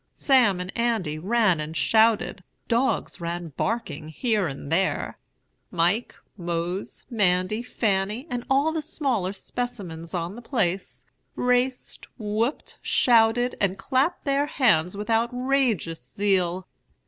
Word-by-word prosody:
Sam 245 -9 +4
and 180 +1 -6
Andy 220 -10 0
ran 200 -2 +2
and 155 +1 -4
shouted; 220 +5 +3 0.2
dogs 235 -5 0
ran 170 0 -4
barking 160 - -3
here 210 - 0
and 140 0 -7
there; 190 +3 0 0.5
Mike, 180 +7 +1 0.2
Mose, 175 +1 -4
Mandy, 195 0 +1
Fanny, 210 0 -1
and 245 -5 -3
all 280 +4 +3
the 320 0 -2
smaller 265 - -1
specimens 195 -6 -5
on 170 +1 -2
the 240 - -9
place, 195 -7 -2 0.3
raced, 250 +1 0
whooped, 225 +4 -2
shouted, 240 +1 +3
and 195 -1 +1
clapped 275 - 0
their 280 +1 +1
hands 200 - +2
with 210 +3 -3
outrageous 235 - +1
zeal. 185 +4 0
210 Hz, 120 wpm, -25 LUFS, 175-245 Hz, 0.5 s, Sam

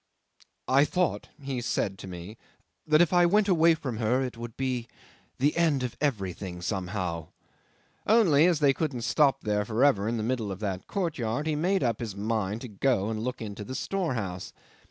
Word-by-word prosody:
"I 135 +2 +5
thought," 180 +3 -1
he 135 -3 -4
said 95 -4 -1
to - - -8
me, 90 +4 -8 0.5
"that 155 +1 +5
if 175 - -1
I 175 -1 +6
went 205 +3 +3
away 165 -3 +5
from 130 -8 -5
her 120 +4 +1
it 125 -2 -4
would 115 -1 -8
be 125 -3 -2 0.5
the 145 +4 +2
end 155 -6 +2
of 125 - -3
everything 95 - -2
somehow." 90 -4 -3 0.8
Only 180 -9 +5
as 170 -4 +1
they 140 -2 +5
couldn't 135 -5 -2
stop 135 +1 +3
there 105 -1 0
for 115 +5 +2
ever 105 -8 +3
in 115 +1 -1
the 110 - -2
middle 115 -3 -1
of 95 - -6
that 95 -3 -3
courtyard, 150 - -2
he 155 -1 0
made 185 +4 +1
up 115 -3 0
his 110 -5 -5
mind 105 0 -2
to 125 - -6
go 110 -1 0
and 110 -1 -3
look 125 -1 -3
into 105 -1 -6
the 130 +5 -6
storehouse. 120 - -3
125 Hz, 190 wpm, -28 LUFS, 105-150 Hz, 0.8 s, I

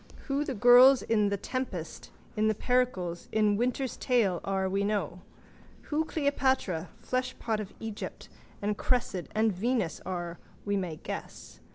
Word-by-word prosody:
Who 280 +1 0
the 275 -3 -3
girls 245 +4 +7
in 210 -2 +2
The 200 - -1
Tempest, 200 -7 -5 0.3
in 215 0 +3
Pericles, 205 -9 0
in 210 -1 +3
Winter's 250 +3 -1
Tale 220 -9 +1
are 195 -1 0
we 195 +1 0
know. 200 -4 -1 0.7
Who 315 +2 +2
Cleopatra, 265 - 0
fleshpot 255 -3 -2
of 205 -2 -6
Egypt, 220 -2 -6 0.4
and 210 +1 0
Cressid 230 -8 0
and 220 -1 +3
Venus 215 -2 -1
are 175 -2 -4 0.3
we 205 0 0
may 180 -5 -2
guess. - - -8
215 Hz, 140 wpm, -29 LUFS, 190-250 Hz, 0.7 s, girls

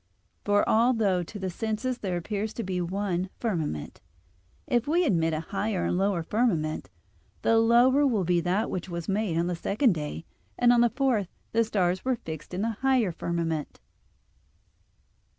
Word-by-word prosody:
For 205 0 +2
although 220 -5 +3
to 175 +5 -8
the 190 -2 -3
senses 225 +6 -2
there 185 -3 -2
appears 210 +4 -3
but 230 -5 -4 0.2
one 190 -1 -1
firmament; 160 - -3 0.6
if 240 +1 0
we 340 +4 +3
admit 165 - +2
a 155 0 -2
higher 195 +2 -2
and - - 0
a 175 - 0
lower 195 -4 +1
firmament, 165 -7 0 0.5
the 225 0 +4
lower 245 +5 +5
will 220 -7 +1
be 175 0 +2
that 185 +6 0
which 185 0 -4
was 170 -1 -5
made 195 -4 0
on 170 - +1
the 175 0 -1
second 210 +7 +2
day, 155 0 -5 0.3
and 245 0 +5
on 240 - +4
the 240 - +4
fourth 245 -7 +1 0.2
the 230 0 +3
stars 185 -4 0
were 260 -1 +1
fixed 160 - -8
in 190 - -1
the 225 -2 -2
higher 260 -7 +3
firmament. 165 -2 -3
200 Hz, 170 wpm, -27 LUFS, 175-230 Hz, 0.6 s, lower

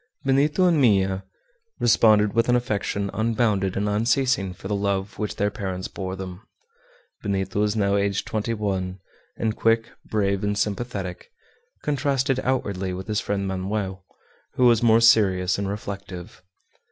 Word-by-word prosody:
Benito 145 +6 +3
and 170 -5 +3
Minha 95 -5 +2 0.5
responded 105 -3 +4
with 115 +1 +2
an 125 - +5
affection 100 -4 -1
unbounded 110 -4 0
and 105 +1 0
unceasing 115 -1 +1
for 90 +1 -9
the 105 - -2
love 100 0 -2
which 105 -2 -2
their 105 +1 0
parents 95 -3 -4
bore 95 -1 -5
them. 95 0 -7 0.8
Benito 95 -1 -2
was 105 0 +1
now 100 -2 +2
aged 100 -1 0
twenty 110 +1 -2
one, 95 -3 -2 0.4
and 110 -1 -1
quick, 115 0 +1
brave, 100 -2 0
and 105 0 0
sympathetic, 120 - -3 0.5
contrasted 135 -2 0
outwardly 100 -8 -1
with 95 +1 -6
his 105 -1 0
friend 100 -1 -2
Manoel, 95 0 -3 0.5
who 125 - +3
was 120 -1 +5
more 115 -1 +5
serious 95 -5 +4
and 100 -1 -2
reflective. 100 -4 -7
105 Hz, 145 wpm, -24 LUFS, 95-115 Hz, 0.8 s, an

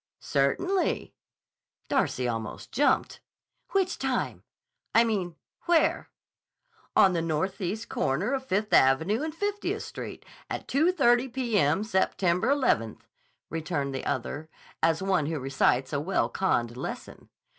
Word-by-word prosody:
"Certainly." 355 - 0 0.7
Darcy 125 - 0
almost 115 -2 -5
jumped. 285 +4 +1 0.5
"Which 380 -2 0
time? - - -1 0.5
I 230 - +7
mean, 195 -7 -1 0.3
where?" 345 -2 +2 0.9
"On 190 - +6
the 170 - 0
northeast 190 +7 -2
corner 175 - 0
of 265 -1 -1
Fifth 210 +1 -1
Avenue 160 - +4
and 310 0 -4
Fiftieth 410 +3 -2
Street, - - -8 0.2
at - - -5
2.30 270 -5 +3
p.m. 210 - +1
September 190 -3 +1
11th," 255 - +1 0.5
returned 145 -4 -2
the 135 - -4
other, 145 +5 -3 0.3
as 165 +2 +2
one 185 -6 +1
who 160 -1 -2
recites 130 0 +1
a 145 - +1
well 190 +5 0
conned 120 -11 0
lesson. - - -7
190 Hz, 120 wpm, -27 LUFS, -, 0.9 s, I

